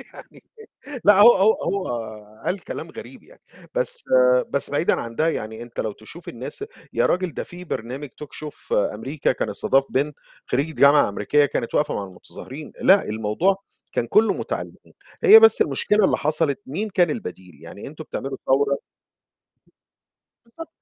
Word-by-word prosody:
يعني - - -13 0.6
لأ، 205 0 +6
هو 240 +3 +9
هو 200 +3 +4
هو 195 -1 -2 0.6
قال 195 - -1
كلام - - -6
غريب - - -11
يعني، - - -21 0.3
بس - - 0 0.5
بس - - -1
بعيدًا - - +1
عن 115 0 -7
ده، 160 +1 +2
يعني 110 -6 -4
أنت 120 0 -6
لو 110 - -3
تشوف 135 +12 -13
الناس 130 - -6 0.3
يا - - +2
رجل 180 -2 -1
ده - - -4
في 180 +1 -10
برنامج 130 +1 -5
talk 145 +4 -11 0.2
show 150 - -11 0.2
أمريكا 140 0 -1
كان 120 - -3
استضاف 135 +6 +1
بنت 145 +2 -1 0.3
خرّيجة 145 +5 -1
جامعة 140 -2 +5
أمريكية 145 +9 +1
كانت 115 - -4
واقفة 150 - +1
مع 100 - -3
المتظاهرين، 130 - -11
لأ، 195 +1 +5
الموضوع 110 - 0 0.3
كان 120 - -1
كلّه 215 - +3
مُتعلّمين، - - -6 0.3
هي 440 +1 +10
بس 450 - +6
المشكلة 210 -1 +1
اللي - - +3
حصلت 155 -2 -1
مين 195 +11 -3
كان 175 -4 +2
البديل، 90 - -7
يعني 85 +5 -10
أنتم 155 +2 -9
بتعملوا 135 -2 -5
ثورة 140 +1 +1 1.6
بالضبط 325 +8 -11
150 Hz, 160 wpm, -22 LUFS, 120-190 Hz, 1.6 s, هي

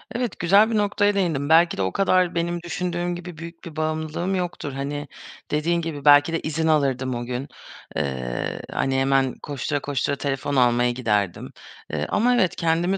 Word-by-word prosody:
Evet, 240 -5 -2
güzel 200 +6 +5
bir 220 - +1
noktaya 205 0 +2
değindin. 160 -7 0
Belki 170 +2 +5
de - - -1
o 95 0 0
kadar 185 -3 +2
benim 170 +1 -1
düşündüğüm 175 0 -2
gibi 175 -1 -8
büyük 170 +1 -10
bir 165 -3 -9
bağımlılığım 155 +4 -2
yoktur. 175 -6 -3
Hani, 145 +2 -4 0.4
dediğin 170 +3 +1
gibi, 155 -4 -5
belki 145 +2 +6
de 165 - +1
izin 160 +1 -2
alırdım 135 -5 +1
o 120 0 -4
gün, 125 +3 -4 0.5
eee, 65 -3 -3
hani, 135 0 0
hemen 135 -1 +2
koştura 145 +1 -2
koştura 140 0 -1
telefon 140 0 -2
almaya 120 -1 +3
giderdim. 105 -7 -1 0.4
Eee, 75 -1 -1
ama 245 +3 +3
evet, 190 -7 +2
kendimi 170 +3 +1
155 Hz, 170 wpm, -23 LUFS, 135-175 Hz, 0.5 s, belki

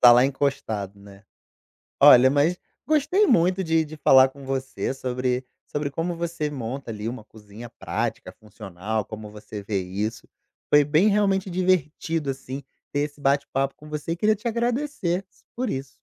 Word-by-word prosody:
Tá 120 -1 +9
lá 120 +2 +6
encostado, 110 -8 -2
né, 100 +1 -15 0.8
olha 130 +1 +8
mas, 150 +6 +2 0.3
gostei 315 +7 +3
muito 185 - +3
de 160 -1 +2
de 155 +1 -10
falar 130 -2 +6
com 135 +1 -13
você 135 -1 -3
sobre 125 0 -2 0.2
sobre 145 -1 -3
como 165 +4 -2
você 165 -3 -3
monta 130 -1 -5
ali, 110 0 -4
uma 120 -3 -6
cozinha 110 +2 -12
prática, - - -4
funcional, 105 0 -5
como 110 0 -9
você 105 -1 -9
vê 100 -1 -1
isso, 100 +5 -4 0.4
foi 145 0 +7
bem 155 +8 +3
realmente 195 -2 +2
divertido 165 -4 0
assim, 135 +1 -6 0.3
ter 145 - 0
esse 145 0 -4
bate-papo 135 -1 0
com 150 - -14
você 150 +2 -4
e - - -2
queria 215 +4 +2
te 225 +4 -11
agradecer 235 -6 -1 0.3
por 250 +1 -1
isso. 135 0 -4
140 Hz, 160 wpm, -24 LUFS, 115-170 Hz, 0.8 s, Tá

